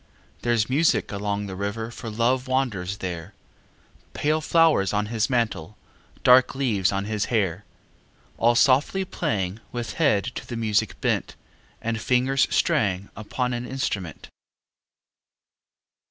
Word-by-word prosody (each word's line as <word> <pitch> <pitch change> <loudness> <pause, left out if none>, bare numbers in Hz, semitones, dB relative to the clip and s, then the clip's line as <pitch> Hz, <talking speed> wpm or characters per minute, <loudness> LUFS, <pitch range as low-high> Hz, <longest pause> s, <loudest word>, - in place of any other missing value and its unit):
Thereâs 115 -2 +1
music 150 +6 +2
along 100 0 -2
the 95 -2 -6
river 100 +4 -4
For 115 0 -7
Love 125 +4 0
wanders 110 -8 -1
there, 90 +2 -6 0.8
Pale 155 +1 0
flowers 160 - +3
on 105 0 +1
his 110 +2 +1
mantle, 105 -7 -1 0.5
Dark 125 +1 +6
leaves 110 -9 +1
on 100 0 -2
his 105 0 -1
hair. 100 -5 -1 0.7
All 120 +1 +4
softly 140 +10 +3
playing, 95 - -2
With 120 -1 -4
head 110 -11 +3
to - - -7
the 120 - -5
music 110 -2 0
bent, - - -1 0.5
And 115 -1 -2
fingers 130 +3 +2
straying 100 - +1
Upon 125 +4 -3
an 120 +1 -4
instrument. 100 - -4
115 Hz, 125 wpm, -24 LUFS, 100-130 Hz, 0.8 s, Dark